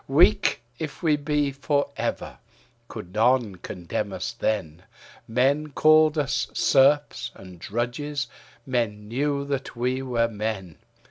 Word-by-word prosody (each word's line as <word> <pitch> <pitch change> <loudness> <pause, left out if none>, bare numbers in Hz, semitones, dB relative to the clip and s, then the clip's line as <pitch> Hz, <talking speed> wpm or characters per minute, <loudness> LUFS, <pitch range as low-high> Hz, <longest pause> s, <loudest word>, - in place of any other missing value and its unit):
Weak - - +4 0.2
if 155 -1 -6
we 155 -3 +4
be 145 -1 0
for 140 +1 0
ever, - - -3 0.5
could 90 +1 -9
none 115 -2 +2
condemn 85 -1 -4
us - - -3
then; 90 -7 -2 0.5
Men 135 +6 +2
called 155 +1 +5
us 140 -1 0
serfs 135 -3 +3
and 90 -2 -12
drudges; 125 - -2 0.4
men 115 -5 -1
knew 140 +4 -1
that 140 -2 -3
were 125 +2 -1
were 120 -3 +1
men. 105 -6 -4
130 Hz, 125 wpm, -25 LUFS, 110-145 Hz, 0.5 s, called